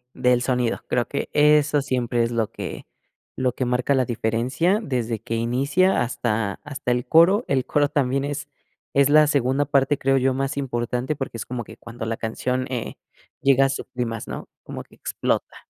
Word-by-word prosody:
del 125 -1 +3
sonido; 125 -2 0
creo 120 -1 0
que 140 - -3
eso 150 0 +4
siempre 125 -3 0
es 115 - 0
lo 115 -3 -1
que - - -7 0.5
lo 130 -1 +1
que 130 - -2
marca 125 +3 +1
la 130 - +3
diferencia 120 - 0
desde 120 - -2
que 115 +2 -5
inicia 140 +11 +2
hasta 115 -4 -2
hasta 135 -4 -3
el 125 0 -1
coro. 185 +8 +5
El 130 -2 +1
coro 145 -1 +2
también 140 -1 0
es 145 0 -4 0.5
es 140 0 +4
la 150 0 +7
segunda 140 -1 +1
parte, 140 0 +2
creo 135 0 +2
yo, 130 0 +2
más 135 +2 -2
importante 125 +1 -2
porque 135 -4 -5
es 115 - -5
como 120 -1 -4
que - - -12
cuando 115 -1 -8
la 115 - -2
canción, 125 +3 -2
eh, 120 -3 -3 0.5
llega 135 0 +4
a - - +3
su 135 - -4
clímax, 120 -3 -4
¿no? - - -6
Como - - -7
que - - -22
explota. - - -3
130 Hz, 185 wpm, -23 LUFS, 120-140 Hz, 0.5 s, la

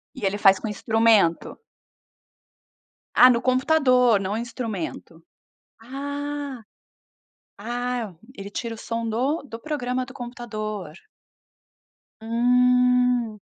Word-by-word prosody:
E 240 - -5
ele 195 +1 0
faz 195 -2 +5
com - - -5
instrumento? 215 -4 +2 1.6
Ah, 250 - +8
no 235 -1 +2
computador 255 -4 +3
não 195 +2 -3
instrumento. 220 -8 -6 0.6
Ah, 285 +1 -5 1.0
ah, 240 -2 -3 0.2
ele 200 0 -8
tira 230 +2 -4
o - - -12
som 230 0 -4
do 265 +9 -1
do 230 -5 -10
programa 255 -4 -3
do 265 - -12
computador. 215 - -6 1.3
Hum. 250 0 +2
240 Hz, 100 wpm, -24 LUFS, 215-255 Hz, 1.6 s, Ah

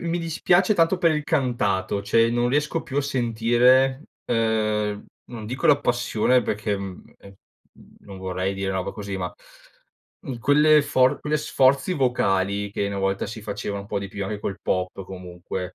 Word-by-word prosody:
mi 170 0 -2
dispiace 175 +4 +2
tanto 170 +2 +2
per 165 -2 +3
il 150 -1 -1
cantato. 100 -9 0
Cioè, 115 +3 +3
non 120 0 +1
riesco 150 +4 0
più 135 +2 -7
a - - +4
sentire, 125 +2 +2 0.2
uhm, 110 -2 0 0.2
non 110 -3 -8
dico 125 +4 -2
la 145 -1 +6
passione 120 0 +1
perché, 105 -1 -2
mhmm, 95 -2 -9
ehm, 100 0 -15 0.7
non 100 -2 -11
vorrei 95 +1 -2
dire 95 0 -2
roba 95 -1 -2
così, 100 -2 -6
ma, 90 -1 -4 0.9
mhmm, 125 -3 -5
quelle 150 +3 +5
for 130 -3 +2
quelle 150 0 0
sforzi 140 +2 +2
vocali 100 - 0
che 100 - -1
una 100 -1 -4
volta 95 0 -1
si 110 -1 -7
faceva 100 0 -4
un 100 - -8
po' 100 - -2
di 100 - -6
più, 100 0 -5
anche 105 +1 -5
col 95 - -4
pop, 90 +1 -2
comunque. 90 0 -7
110 Hz, 170 wpm, -24 LUFS, 100-135 Hz, 0.9 s, la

